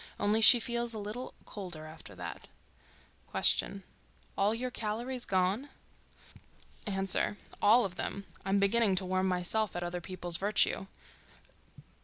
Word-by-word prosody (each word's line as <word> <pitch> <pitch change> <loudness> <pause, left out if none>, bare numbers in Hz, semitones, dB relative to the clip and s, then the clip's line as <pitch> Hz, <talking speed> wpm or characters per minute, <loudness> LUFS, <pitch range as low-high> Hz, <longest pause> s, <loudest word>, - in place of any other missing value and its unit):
Only 210 +2 +2
she 240 +2 +9
feels 235 0 0
a - - -4
little 215 +5 -6
colder 175 -6 -7
after 155 -10 -11
that. 90 -1 -8 0.8
Q.—All 65 - 0
your 250 +2 -4
calories 240 +3 -3
gone? 190 +9 0 1.2
A.—All 205 +3 +2
of 185 -1 -6
them. 200 0 -4 0.2
I'm 195 +1 +1
beginning 200 0 +2
to 185 0 -1
warm 185 +1 0
myself 185 +3 0
at 175 - -3
other 175 0 -4
people's 175 -1 -1
virtue. 200 -1 +1
200 Hz, 120 wpm, -31 LUFS, 180-220 Hz, 1.2 s, she